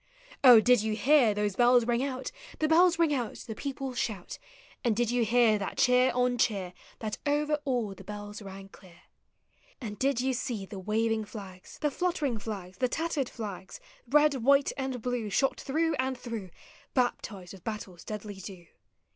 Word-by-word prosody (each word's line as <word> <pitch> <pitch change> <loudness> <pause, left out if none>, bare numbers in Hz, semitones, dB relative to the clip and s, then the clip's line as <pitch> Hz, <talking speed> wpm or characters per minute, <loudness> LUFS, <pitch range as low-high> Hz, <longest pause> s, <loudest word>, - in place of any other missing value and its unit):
Oh, 245 -4 +10
did 245 0 +4
you 215 0 -1
hear 245 -1 +4
those 210 -2 -1
bells 245 -1 +5
ring 240 +1 +1
out, 265 - -4 0.3
The 310 - +1
bells 345 +2 +5
Hug 330 -2 +2
out. 245 -6 -1
the 225 - -5
people 270 +1 -5
shout. 210 -7 -4 0.4
And 235 -4 +2
did 240 +1 +1
you 245 -1 +2
hear 230 -1 +4
that 195 - -5
cheer 250 0 +4
on 250 -1 +1
cheer 190 -5 0 0.2
That 215 -2 -5
over 295 +1 +1
all 240 -7 -1
the 195 - -13
bells 205 +2 -7
rang 195 -1 -9
clear? 180 -3 -17 0.8
And 210 -5 -7
did 270 -2 +1
you 260 +1 +1
see 235 -4 -3
the 195 0 -8
waving 220 +2 0
Hags, 195 -4 -10
The 300 -2 +1
fluttering 300 -9 -1
tlags, 190 -4 -7
the 255 - +1
tattered 315 -3 -1
Hags, 200 -5 -7 0.3
Red, 295 +3 +4
white, 275 +3 +4
and 265 -4 -4
blue, 245 -4 -2
shot 270 +6 +1
through 320 +3 0
ami 260 0 0
through, 230 -6 -6 0.5
Raptized 210 -7 -1
with 190 -3 -13
battle's 205 -5 -6
deadly 205 -2 -7
dew? 185 -2 -9
235 Hz, 175 wpm, -29 LUFS, 205-265 Hz, 0.8 s, Oh